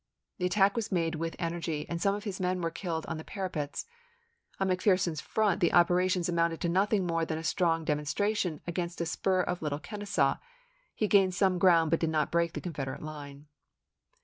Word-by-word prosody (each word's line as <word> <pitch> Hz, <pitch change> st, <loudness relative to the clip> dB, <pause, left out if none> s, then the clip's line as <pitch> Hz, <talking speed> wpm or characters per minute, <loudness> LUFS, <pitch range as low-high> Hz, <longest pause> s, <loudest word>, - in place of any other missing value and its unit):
The 180 Hz, -, +1 dB
attack 195 Hz, +1 st, +3 dB
was 230 Hz, -3 st, -2 dB
made 165 Hz, -3 st, +1 dB
with 165 Hz, +1 st, -3 dB
energy, 165 Hz, -3 st, -3 dB
and 170 Hz, 0 st, -4 dB
some 200 Hz, 0 st, +2 dB
of 205 Hz, -, -6 dB
his 200 Hz, -4 st, -5 dB
men 185 Hz, 0 st, 0 dB
were 165 Hz, -1 st, -1 dB
killed 165 Hz, -2 st, -4 dB
on 165 Hz, -, -4 dB
the -, -, -7 dB
parapets. 175 Hz, -8 st, -4 dB, 0.7 s
On 195 Hz, -, +1 dB
McPherson's 185 Hz, -3 st, +1 dB
front 210 Hz, -4 st, +1 dB
the 170 Hz, -, +3 dB
operations 180 Hz, 0 st, +3 dB
amounted 170 Hz, -1 st, +1 dB
to 170 Hz, -, 0 dB
nothing 195 Hz, +2 st, +2 dB
more 165 Hz, -1 st, 0 dB
than 160 Hz, -1 st, -2 dB
a 160 Hz, -, -6 dB
strong 165 Hz, -2 st, +1 dB
demon 150 Hz, -1 st, 0 dB
stration 185 Hz, +1 st, -1 dB
against 175 Hz, 0 st, -3 dB
a 170 Hz, -, 0 dB
spur 185 Hz, +2 st, +1 dB
of 180 Hz, 0 st, -2 dB
Little 150 Hz, -2 st, -2 dB
Kenesaw; 205 Hz, +2 st, 0 dB, 0.6 s
he 215 Hz, -, 0 dB
gained 195 Hz, -3 st, +4 dB
some 185 Hz, -1 st, +2 dB
ground 170 Hz, -3 st, +5 dB
but 165 Hz, -, +3 dB
did 165 Hz, -, 0 dB
not 155 Hz, -2 st, 0 dB
break 170 Hz, -1 st, +1 dB
the -, -, -5 dB
Con 175 Hz, -, -5 dB
federate 135 Hz, -1 st, -5 dB
line. 145 Hz, -2 st, -8 dB
175 Hz, 200 wpm, -30 LUFS, 160-190 Hz, 0.7 s, ground